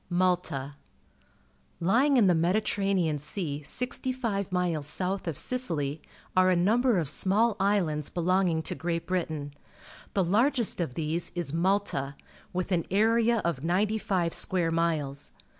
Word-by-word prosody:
Malta. 175 -6 0 0.5
— 65 0 -37
Lj 220 +11 +3
ing 280 -2 +3
in 230 - +5
the 180 - +5
Mediterranean 180 -2 +1
Sea 150 -1 -4
sivt^jji 250 - -2
vp 210 -7 -2
milps 175 -5 -1
south 185 +5 -3
of 165 - -2
Sicily, 160 - -2 0.3
are 185 0 +5
a 185 - +4
number 225 +6 +3
of 165 -4 0
small 205 +9 +2
islands 175 -7 +1
belonging 175 -2 +1
to - - -3
Great 170 -1 -3
Britain. 155 -6 -3 0.6
The 195 - +3
largest 230 +3 +1
of 130 -7 -3
these 160 +2 -2
is 170 -5 -3
Malta, 170 -6 0 0.4
with 185 +1 -3
an 170 -3 0
area 225 +3 +3
of 155 -6 -1
ninety 200 +6 +1
five 180 -5 0
square 175 -3 +3
miles. 155 -4 -1
180 Hz, 145 wpm, -28 LUFS, 160-200 Hz, 0.6 s, in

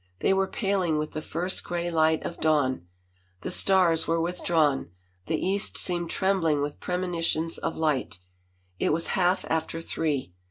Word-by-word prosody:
They - - +3
were 195 0 +1
paling 190 -6 0
with 150 0 -2
the 155 - -4
first 175 +5 -3
gray 175 0 -3
light 160 -1 +2
of 170 - -5
dawn: 140 - +1 0.5
the - - -4
stars 180 -4 +4
were 165 0 +1
withdrawn, 165 - +1 0.4
the 160 - 0
east 195 +2 +1
seemed 175 -2 +2
trembling 165 -7 +1
with 145 0 -4
premonitions 170 -2 -1
of - - -3
light. 150 - 0 0.6
It - - +2
was 165 +1 0
half 185 +1 +2
after 160 0 -1
three. 150 - -2
165 Hz, 155 wpm, -26 LUFS, 155-180 Hz, 0.6 s, stars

